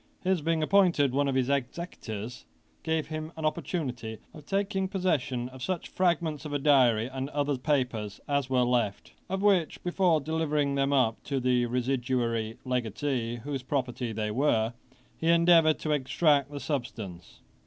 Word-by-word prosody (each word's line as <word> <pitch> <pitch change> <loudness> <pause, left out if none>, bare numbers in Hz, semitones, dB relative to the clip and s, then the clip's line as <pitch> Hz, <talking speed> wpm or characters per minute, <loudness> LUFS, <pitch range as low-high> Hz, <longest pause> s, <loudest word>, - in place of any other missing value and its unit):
His 185 -2 +1
being 160 0 +1
appointed 170 -6 +4
one 140 +1 +2
of 135 - 0
his 130 -1 +2
executors, 125 - -4 0.4
gave 160 -1 -1
him 155 0 -5
an 160 - -3
opportunity 125 -8 -3 0.2
of 150 -2 -13
taking 195 -1 0
possession 145 -10 -1
of 130 0 -12
such 180 +4 -3
fragments 170 -5 0
of 150 - -6
a - - +2
diary 130 -6 +4
and 130 +2 -4
other 145 -1 0
papers 125 -7 -1
as 140 -2 0
were 130 -1 +3
left; 120 -5 -1 0.2
of 190 +1 -2
which, 190 -6 +2
before 175 -2 +2
delivering 150 -2 0
them 140 0 +1
up 125 -5 +2
to 140 -2 -1
the 125 -1 +2
residuary 120 -2 -1
legatee, 120 0 -1
whose 140 -1 -3
property 125 -3 -2
they 105 -1 -2
were, 115 -2 +1 0.4
he 160 - -2
endeavoured 170 -2 +5
to 155 - -3
extract 145 0 +2
the 145 -1 -6
substance. 110 - -5
140 Hz, 155 wpm, -28 LUFS, 125-160 Hz, 0.4 s, endeavoured